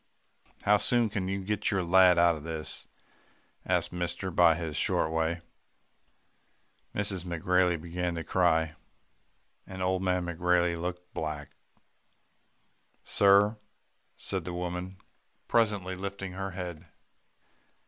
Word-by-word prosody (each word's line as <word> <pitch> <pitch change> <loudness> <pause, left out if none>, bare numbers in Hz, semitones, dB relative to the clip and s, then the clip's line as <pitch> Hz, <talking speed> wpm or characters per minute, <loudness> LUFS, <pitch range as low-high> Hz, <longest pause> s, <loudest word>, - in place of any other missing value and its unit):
"'How 105 +1 +5
soon 120 +1 +2
can 95 -3 -2
you 95 0 -2
get 105 +1 -1
your 95 -3 0
lad 90 0 +6
out 85 0 +5
of 75 - -9
this?' 80 -1 -5 0.8
asked 90 -1 0
mister 90 +2 -2
in 85 -2 +5
his 80 -3 -4
short 80 - +1
way. 80 +1 0 1.5
"Mrs. 100 -3 -1
McGrailey 90 0 +1
began 85 +1 -3
to 85 - -4
cry, 80 -3 +2 0.9
and 95 0 -5
old 95 0 +1
man 90 -1 0
McGrailey 85 0 +1
looked 90 0 -5
black. 75 -3 -4 1.5
"'Sir,' 100 +2 +4 0.6
said 95 -3 -3
the 90 +1 -5
woman 90 +1 -4 0.5
presently 105 -5 +1
lifting 95 0 -5
her 95 +1 -4
head. 90 -2 -7
90 Hz, 120 wpm, -29 LUFS, 85-95 Hz, 1.5 s, lad